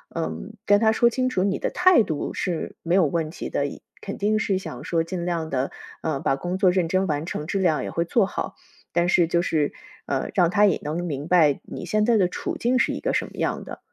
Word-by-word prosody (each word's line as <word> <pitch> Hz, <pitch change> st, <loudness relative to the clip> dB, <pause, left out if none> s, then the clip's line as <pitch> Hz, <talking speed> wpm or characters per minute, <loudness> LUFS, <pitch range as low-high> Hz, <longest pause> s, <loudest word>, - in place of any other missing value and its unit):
嗯， 165 Hz, +6 st, -4 dB
跟 205 Hz, 0 st, +5 dB
他 220 Hz, 0 st, +4 dB
说 235 Hz, +2 st, +4 dB
清 255 Hz, +2 st, 0 dB
楚 185 Hz, -8 st, 0 dB
你 195 Hz, 0 st, +1 dB
的 -, -, -2 dB
态 360 Hz, -8 st, +5 dB
度 155 Hz, -7 st, -3 dB
是 175 Hz, -4 st, -3 dB
没 170 Hz, -, 0 dB
有 190 Hz, 0 st, +5 dB
问 160 Hz, +1 st, -2 dB
题 -, -, -6 dB
的， -, -, 0 dB, 0.3 s
肯 -, -, -6 dB
定 215 Hz, +2 st, +2 dB
是 195 Hz, -3 st, 0 dB
想 -, -, -8 dB
说 165 Hz, -1 st, 0 dB
尽 175 Hz, +1 st, -4 dB
量 165 Hz, -2 st, -2 dB
的， 135 Hz, -1 st, -1 dB, 0.3 s
呃， 155 Hz, -4 st, -1 dB
把 135 Hz, -, +1 dB
工 175 Hz, +6 st, -3 dB
作 190 Hz, -, +5 dB
认 180 Hz, -2 st, +1 dB
真 185 Hz, +2 st, +1 dB
完 150 Hz, 0 st, -1 dB
成， 155 Hz, -2 st, -4 dB
质 195 Hz, -, -1 dB
量 170 Hz, -5 st, +2 dB
也 -, -, -4 dB
会 170 Hz, -, -1 dB
做 205 Hz, +4 st, +3 dB
好。 -, -, -4 dB, 0.4 s
但 175 Hz, 0 st, +2 dB
是 175 Hz, -, +4 dB
就 170 Hz, +1 st, +2 dB
是， 155 Hz, -4 st, 0 dB, 0.3 s
呃， 135 Hz, -2 st, -2 dB
让 175 Hz, -3 st, +4 dB
他 205 Hz, +3 st, +5 dB
也 195 Hz, -, +2 dB
能 155 Hz, +4 st, -2 dB
明 145 Hz, -3 st, -4 dB
白 160 Hz, -6 st, +4 dB
你 -, -, -7 dB
现 210 Hz, +4 st, +1 dB
在 235 Hz, -1 st, +4 dB
的 190 Hz, -3 st, +4 dB
处 180 Hz, -, -4 dB
境 250 Hz, +2 st, +1 dB
是 -, -, +2 dB
一 -, -, -4 dB
个 -, -, -1 dB
什 -, -, +1 dB
么 -, -, -13 dB
样 -, -, -1 dB
的。 -, -, -9 dB
175 Hz, 265 characters per minute, -24 LUFS, 160-200 Hz, 0.4 s, 跟